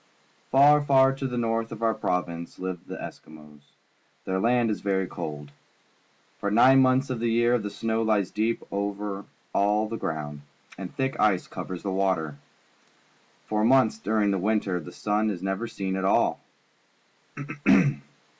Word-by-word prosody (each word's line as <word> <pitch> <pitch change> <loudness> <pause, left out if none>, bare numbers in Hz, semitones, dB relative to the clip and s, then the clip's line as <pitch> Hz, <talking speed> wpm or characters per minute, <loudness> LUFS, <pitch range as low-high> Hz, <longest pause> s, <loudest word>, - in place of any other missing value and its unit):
^Far, 145 +2 +6
far 135 -1 +4
to 135 0 -3
the 125 -1 -4
north 115 -1 -1
of 115 0 -7
our 115 -1 +3
province 85 -3 -3
hve 95 -1 -4
the - - -6
Eskimos. 75 -1 -11 0.6
Their 95 0 -1
land 120 +1 +2
is 105 - -3
very 95 -1 0
cold. 75 -4 -7 0.9
P'or 100 - -1
nine 130 +5 +6
months 130 +1 +2
of 125 - -3
the 115 0 0
year 120 +1 +3
the 105 -1 -4
snow 110 +2 -2
lies 105 -4 +1
deep 110 +2 -1
over 100 0 -3 0.3
all 105 +2 +2
the 115 +1 -4
ground, 75 -2 -4 0.3
and 90 -1 -7
thick 135 0 -2
ice 100 -4 +2
covers 90 -2 -7
the 100 - -2
water. 95 -6 0 1.1
For 105 0 0
months 120 -2 +4
during 105 -1 +1
the 95 - 0
winter 100 -2 0
the 75 - -9
sun 105 +1 0
is 95 -3 -4
never 95 +4 -2
seen 95 -4 -4
at 95 - -2
all. 95 - +2
105 Hz, 155 wpm, -26 LUFS, 95-115 Hz, 1.1 s, ^Far